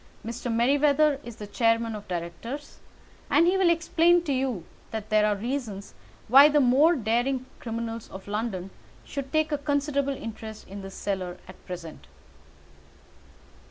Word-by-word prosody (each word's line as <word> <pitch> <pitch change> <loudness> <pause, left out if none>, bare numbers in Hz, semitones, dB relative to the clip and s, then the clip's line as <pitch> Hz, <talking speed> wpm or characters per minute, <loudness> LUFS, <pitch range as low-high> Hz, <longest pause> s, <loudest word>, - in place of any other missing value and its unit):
Mr. 235 +1 -4
Merryweather 285 +4 +3
is 235 -2 -9
the 210 - -8
chairman 230 +2 +1
of 210 -1 -8
directors, 180 - -6 0.5
and 335 - +5
he 360 +2 +3
will 380 -2 +4
explain 340 +1 +3
to 290 -5 -1
you 255 -9 -1 0.2
that 220 -1 -5
there 215 0 +4
are 210 - +2
reasons 220 -3 -4 0.3
why 275 +6 +9
the 295 0 +4
more 280 +6 +5
daring 250 +2 0
criminals 230 -1 -5
of 190 +1 -10
London 200 -3 -3 0.3
should 275 -2 -5
take 310 +1 +1
a 295 - 0
considerable 285 -1 0
interest 220 -1 -8
in 200 +1 -8
this 195 0 -9
cellar 185 -3 -3
at 185 - -14
present." 170 -3 -8
235 Hz, 150 wpm, -27 LUFS, 210-285 Hz, 0.5 s, why